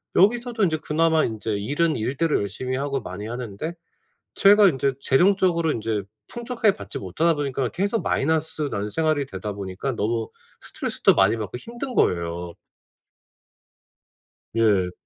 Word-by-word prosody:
여기서도 235 +3 +3
인제 160 -4 +2
그나마 160 +1 +2
인제 110 0 -3
일은 145 +11 0
일대로 140 +8 0
열심히 105 +6 -3
하고 140 0 -1
많이 100 +1 -7
하는데 120 +5 -5 0.6
제가 205 +1 +7
인제 135 -3 0
재정적으로 175 +2 +3
인제 110 -4 -2 0.2
풍족하게 235 -4 0
받지 - - -7
못하다 155 - +1
보니까 135 -4 -2
계속 200 +5 -1
마이너스 160 +1 0
나는 100 +1 -2
생활이 155 -1 +1
되다 105 -3 -6
보니까 100 +6 -4
너무 115 +1 -1 0.3
스트레스도 - - +1
많이 95 +3 +4
받고 110 0 -5
힘든 240 - -7
거예요. 85 0 0 2.0
예. 100 -5 +3
135 Hz, 325 characters per minute, -24 LUFS, 105-170 Hz, 2.0 s, 제가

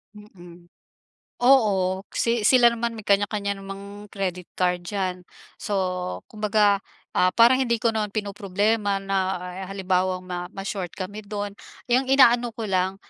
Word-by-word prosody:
Mm. 175 -4 -15 0.7
Oo 200 -7 +3
si 230 -2 0
sila 245 0 +6
naman 235 0 -2
may 220 - -8
kanya-kanya 200 0 +1
namang 200 +1 -9
credit 185 -3 -3
card 180 -1 0
diyan. 185 -2 -3 0.3
So, 185 -3 -2
kumbaga, 210 -2 +2 0.4
ah, 185 0 +3
parang 240 +2 +6
hindi 235 -4 0
ko 230 - +3
naman 215 -2 -2
pinoproblema 205 0 -1
na 190 -2 -1 0.2
halimbawang 185 -1 -1
ma 180 -1 -5
ma-short 195 -2 -5
kami 205 +3 -7
dun 205 0 -4 0.4
yung 255 +2 +3
inaano 245 -3 +4
ko 230 - -5
lang 185 0 +1
200 Hz, 135 wpm, -24 LUFS, 185-220 Hz, 0.7 s, sila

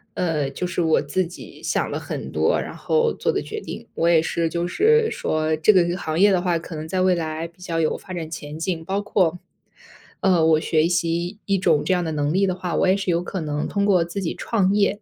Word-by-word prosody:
呃， 155 -6 0
就 160 +6 -4
是 175 0 -2
我 160 -1 +3
自 185 -2 -1
己 175 - -12
想 - - -1
了 - - -2
很 - - -6
多 - - +2
然 - - -6
后 470 0 +1
做 470 - 0
的 400 - -1
决 435 0 -6
定。 - - -8
我 170 +1 +1
也 165 -2 +5
是 165 0 -1
就 170 +1 -2
是 445 - +3
说 155 0 0
这 160 +7 +5
个 185 -3 +5
个 175 +1 -1
行 160 -2 -3
业 205 +1 +6
的 180 -2 +2
话， 175 -2 +1
可 165 0 -8
能 155 +1 -6
在 185 +2 -1
未 185 0 +4
来 160 -1 -3
比 170 +2 -23
较 165 -3 -2
有 155 - +1
发 185 - -9
展 165 -2 -4
前景， 160 +2 -4
包 195 +3 -1
括， 185 -4 +1 0.8
呃， 180 -4 +3
我 160 -1 +4
学 160 0 +2
习 170 +2 -1
一 195 -2 +1
种 155 -5 +2
这 190 - +2
样 180 -1 +1
的 160 - -3
能 145 +1 0
力 195 +1 +2
的 180 - -1
话， 180 -2 -4
我 - - +2
也 190 +2 +4
是 190 -2 -1
有 170 +1 +1
可 185 +1 -5
能 150 -1 -2
通 200 0 0
过 185 -4 +4
自 185 +4 -5
己 170 - -2
创 200 -4 0
业， 205 0 +1
175 Hz, 270 characters per minute, -22 LUFS, 160-190 Hz, 0.8 s, 业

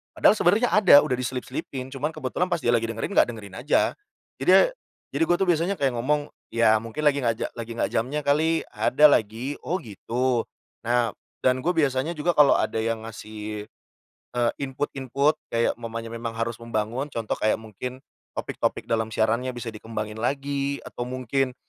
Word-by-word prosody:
Padahal - - +5
sebenernya 210 +8 +3
ada 190 -9 +8
udah 130 - 0
diselip-selipin, 130 +1 -4
cuman 145 +4 -2
kebetulan 155 +5 -1
pas 175 - +1
dia 120 - +3
lagi 115 -1 +2
dengerin 115 - -3
gak - - +6
dengerin 100 -4 -10
aja. 140 +5 +2 0.5
Jadi, - - +3
e - - +9 0.5
jadi - - +2
gue 175 - +4
tuh 195 - +1
biasanya 175 +4 +2
kayak 135 -2 +2
ngomong, 145 +4 0 0.2
"Ya 115 -1 +5
mungkin 115 +7 -6
lagi 145 -1 +4
gak 115 -1 +2
ja - - -1
lagi 115 0 -5
gak - - +1
jamnya 130 +7 0
kali, 160 +3 +2
ada 125 +7 +3
lagi, 115 +6 0
'oh 180 - -1
gitu'." 120 +3 -1 0.4
Nah 120 -2 +2 0.3
dan 130 0 +3
gue 180 - +2
biasanya 145 0 +1
juga 155 +3 +1
kalo 145 -2 +6
ada 110 - 0
yang 115 0 -2
ngasih, 105 -1 -7 0.7
eee, 120 -1 +2
input-input, 140 +1 0 0.2
kayak 115 0 +2
umpamanya 115 0 -5
memang 115 -1 -5
harus 115 0 -2
membangun 115 +4 -2
contoh 115 -4 -2
kayak 110 - +3
mungkin 110 +4 -7 0.4
topik-topik - - -2
dalam 110 -1 +1
siarannya 115 +4 +1
bisa 120 -1 -5
dikembangin 110 0 -6
lagi 140 +2 -1
atau 120 - -6
mungkin 130 +1 -1
125 Hz, 170 wpm, -25 LUFS, 115-140 Hz, 0.7 s, e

